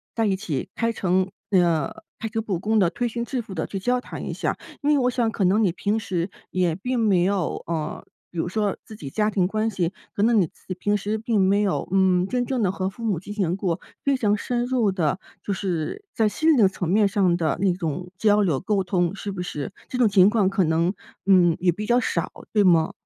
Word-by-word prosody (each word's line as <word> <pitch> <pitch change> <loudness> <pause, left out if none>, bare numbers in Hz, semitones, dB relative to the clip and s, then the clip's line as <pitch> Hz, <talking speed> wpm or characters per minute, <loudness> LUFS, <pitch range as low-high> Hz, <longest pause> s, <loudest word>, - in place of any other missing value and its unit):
在 225 - +1
一 200 -2 +2
起 165 -10 -3
开 230 0 0
诚 185 -2 +1 0.2
那 195 -3 +4
个 175 +6 0
开 225 - -4
诚 225 0 -2
布 205 -5 -2
公 215 +5 +1
地， 185 -4 +4
推 240 +6 -2
心 235 +1 -3
置 255 0 -2
腹 210 -4 -10
地 165 - -2
去 195 - -5
交 245 +6 +1
谈 - - -7
一 - - -3
下。 - - -2 0.2
因 285 - +1
为 300 - +5
我 250 -2 +2
想 240 -2 +1
可 220 -2 -2
能 190 +4 +3
你 190 -6 +2
平 205 +4 0
时 185 -4 -2 0.2
也 180 -3 +1
并 250 +8 -2
没 205 -6 +3
有， 195 -3 -1
呃， 160 -2 -3 0.3
比 175 - -11
如 165 - 0
说 205 +1 -1
自 215 - -10
己 145 -10 -7
家 210 +9 +1
庭 195 -4 +1
关 215 +4 0
系， 180 -5 -1 0.2
可 205 - +1
能 230 0 +4
你 180 - +3
自 - - -27
己 - - -1
平 205 +3 0
时 210 +2 -1
并 220 -1 0
没 195 +2 +3
有， 200 -3 0
嗯， 185 -2 +3
真 250 -1 0
正 250 -2 -1
地 185 - +2
和 190 0 -2
父 215 +4 -11
母 205 -7 0
进 205 +4 -8
行 190 -4 0
过 180 -4 -1 0.2
非 280 -1 +3
常 210 -5 +1
深 240 +3 -1
入 245 -6 +1
的， 180 0 0 0.2
就 - - -3
是 190 - -3
在 220 -2 +2
心 315 +9 +2
灵 300 - +4
的 200 -4 +6
层 185 -2 -4
面 200 +3 +3
上 190 -3 +2
的 160 -4 0
那 195 -2 +3
种 175 0 -4
交 210 0 +4
流 165 -9 +1
沟 195 -1 0
通， 175 0 +1
是 200 0 -5
不 185 - -4
是？ 150 -1 -5 0.2
这 255 - -3
种 245 -2 +5
情 195 -2 +6
况 210 -3 +2
可 195 -1 +1
能， 165 +3 +1 0.3
嗯， 180 -4 +5
也 175 -1 +2
比 210 +5 -5
较 240 +3 +3
少？ - - -1 0.2
对 210 -2 +4
吗？ 165 -4 +4
195 Hz, 265 characters per minute, -24 LUFS, 180-220 Hz, 0.3 s, 的